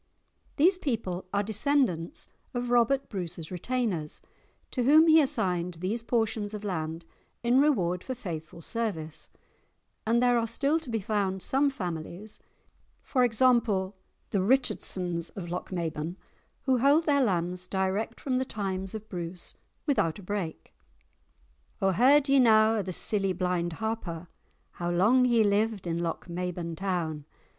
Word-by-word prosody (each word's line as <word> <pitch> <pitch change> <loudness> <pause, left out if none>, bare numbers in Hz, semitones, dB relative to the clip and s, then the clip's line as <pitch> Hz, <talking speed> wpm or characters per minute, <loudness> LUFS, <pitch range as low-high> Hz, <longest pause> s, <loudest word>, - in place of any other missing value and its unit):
These 360 +5 +4
people 215 - -2
are 200 0 +1
descendants 220 - 0 0.3
of 245 0 -2
Robert 245 +3 +3
Bruce's 175 -4 -5
retainers, 185 -5 -2 0.5
to 255 - -1
whom 300 +6 +6
he 320 -1 +7
assigned 180 - 0
these 190 +8 -2
portions 225 -3 -1
of 210 - -7
land 165 -4 -3 0.4
in 245 +3 +4
reward 180 - +1
for 260 - -4
faithful 165 -7 -7
service, 185 -10 -3 0.8
and 230 +1 +3
there 245 -1 +4
are 230 - -1
still 280 +7 +1
to 315 - -10
be 225 -2 -1
found 195 -3 -1
some 280 +2 +2
families 180 - -5 0.8
(e.g. 245 -4 +3
the 205 -6 +1
Richardsons 185 -7 0
of 175 -3 -6
Lochmaben) 170 -2 -3 0.5
who 260 -3 +2
hold 285 +6 +5
their 285 -2 +3
lands 180 -4 0
direct 190 +3 -1
from 255 -2 0
the - - +1
times 195 -4 -4
of 215 0 -7
Bruce 175 -2 -5 0.3
without 165 - +1
a 200 - -11
break. 180 -4 -4 1.1
"O 195 0 +2
heard 270 - +5
ye 275 0 +5
na 220 -2 +6
o' - - +1
the 190 -1 -5
silly 195 +1 0
blind 180 -1 -1
Harper, 180 -5 -4 0.4
How 175 0 -4
long 215 +9 +4
he 235 -3 +4
lived 205 0 +1
in 170 -1 -1
Lochmaben 170 0 -3
town? 165 -5 -2
200 Hz, 140 wpm, -28 LUFS, 175-245 Hz, 1.1 s, he